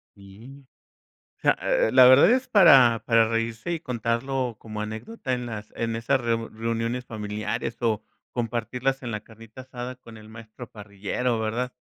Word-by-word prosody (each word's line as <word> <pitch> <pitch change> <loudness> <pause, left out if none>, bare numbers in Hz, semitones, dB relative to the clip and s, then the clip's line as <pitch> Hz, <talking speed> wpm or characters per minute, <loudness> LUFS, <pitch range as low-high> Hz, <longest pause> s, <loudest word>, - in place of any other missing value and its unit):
Sí. 115 +8 -14 0.7
Sea, - - +2
eh, 110 - +2
la 130 0 +8
verdad 130 +9 +7
es 255 +1 +1
para 135 - +6
para 115 -1 +4
reírse 115 +6 -2
y 165 - -3
contarlo 125 -1 -2
como 110 -1 -7
anécdota 130 - -5
en 125 -1 -2
las 110 -2 -7
en 115 -1 -2
esas 115 +3 0
reu 115 -1 -1
reuniones 115 +2 -3
familiares, 105 +1 -4
o, 115 -4 0 0.3
compartirlas 120 +3 -2
en 120 - -5
la 105 -1 -4
carnita 115 +3 -13
asada 125 0 -7
con 115 -2 -14
el 110 0 -14
maestro 115 +2 -11
parrillero, 105 +4 -3
¿verdad? 120 +3 -2
115 Hz, 155 wpm, -25 LUFS, 110-125 Hz, 0.7 s, la